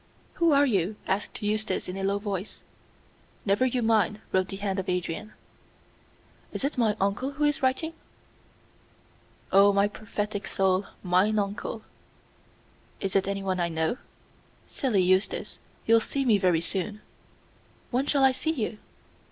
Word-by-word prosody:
"Who 335 -1 +5
are 285 0 +5
you?" 200 -5 +1
asked 200 +2 -2
Eustace, 210 -1 -1
in 180 - -5
a 195 - -4
low 200 +1 +1
voice. 200 -1 -5 0.8
"Never 205 +6 +3
you 250 -1 -1
mind," 215 -1 +2
wrote 185 0 +2
the 195 - -6
hand 195 -1 -2
of 190 - -4
Adrian. 180 +4 -3 1.2
"Is - - -4
it 280 - 0
my 225 -5 +2
uncle 200 +8 0
who 295 +2 -2
is 295 -1 +2
writing?" 265 +5 0 1.6
"Oh, 200 +1 +7
my 200 0 +3
prophetic 210 0 -4
soul, 190 0 +1 0.2
mine 190 +4 +3
uncle." 205 +2 -3 1.2
"Is 195 - -3
it 195 0 +3
anyone 195 -2 -1
I 170 -1 +1
know?" 160 +7 0 0.7
"Silly 225 -9 +1
Eustace, 185 +2 +1 0.3
you'll 230 0 +6
see 275 +5 -2
me 220 -5 +4
very 180 -4 +3
soon." 200 +4 -2 0.9
"When 260 +3 0
shall 280 -2 +3
I 265 - +7
see 315 +5 -1
you?" 220 -6 -3
205 Hz, 145 wpm, -27 LUFS, 190-235 Hz, 1.6 s, Oh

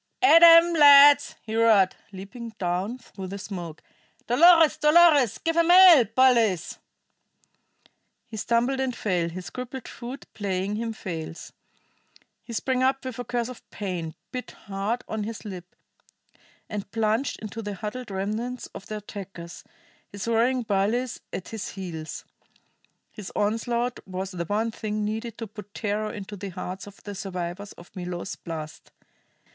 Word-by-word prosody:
"At 330 -3 +8
'em, 335 0 +8
lads!" 285 -2 +7
he 220 0 -5
roared, 220 -5 +4 0.2
leaping 220 +4 -9
down 185 +6 -2
through 195 -6 -10
the 195 +2 -6
smoke. 175 -6 -7 0.4
"Dolores, 325 +5 +6
Dolores! 300 - +5
Give 330 0 -2
'em 335 0 +3
hell, 355 -8 +9
bullies!" 235 -9 +3 1.5
He 230 -2 -10
stumbled 240 +5 0
and 260 -2 -1
fell, 180 -6 -1
his 180 +2 -8
crippled 255 0 -7
foot 250 +3 -8
playing 200 0 -2
him 230 0 -3
false. 170 -7 -7 0.9
He - - -12
sprang 255 +3 -1
up 265 +1 +1
with 255 -2 -6
a - - -2
curse 240 -1 -2
of 255 -1 -12
pain, 175 -6 -5 0.2
bit 250 0 -6 0.2
hard 200 +5 -3
on 220 -1 -3
his 220 +1 -7
lip, 180 -3 -9 0.9
and 205 -2 -6
plunged 225 +4 -1
into 220 +1 -7
the 205 -2 -5
huddled 215 +6 -6
remnants 215 +6 -3
of 195 - -10
the 215 - -4
attackers, 195 -4 -9 0.5
his 200 +1 -6
roaring 240 +2 +2
bullies 220 +4 -1
at 185 - -6
his 220 -2 -5
heels. 170 -5 -7 0.9
His 205 -3 -9
onslaught 235 +3 -1
was 190 +1 -5
the 175 -2 -4
one 215 +5 -1
thing 215 -1 -3
needed 220 +2 -4
to 230 - -5
put 210 -1 -12
terror 215 0 -2
into 205 0 -8
the 200 0 -6
hearts 185 +1 -7
of 200 - -14
the 205 - -7
survivors 185 0 -6
of 175 - -16
Milo's 180 0 -5
blast. 155 -2 -8
215 Hz, 150 wpm, -25 LUFS, 195-245 Hz, 1.5 s, hell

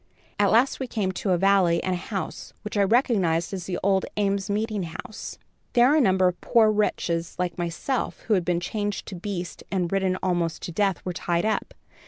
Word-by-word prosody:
"At 205 -1 +4
last 235 +7 +3
we 260 - -3
came 205 -5 -1
to 190 - -3
a 180 - +4
valley 185 -2 +3
and 185 - 0
a - - 0
house, 190 +2 -5
which 210 - -6
I 205 - +3
recognized 195 -7 +2
as 185 -3 -5
the 180 - -2
old 195 -1 +3
Ames 200 -1 0
Meeting 215 0 -1
House. 170 +5 -7 0.4
Here 245 +4 +6
a 310 - +5
number 190 -5 +4
of 180 -1 -2
poor 220 -3 +4
wretches 170 -5 -1
like 180 -1 -2
myself 175 +10 -2
who 220 - 0
had 185 -3 +2
been 175 0 +1
changed 205 +3 -3
to 195 - -6
beasts 180 -1 -5
and 180 -3 0
ridden 190 -1 +1
almost 175 -3 0
to - - -4
death, 195 +1 0
were 180 - -2
tied 170 +2 -1
up. 220 - -1
190 Hz, 205 wpm, -25 LUFS, 175-210 Hz, 0.4 s, Here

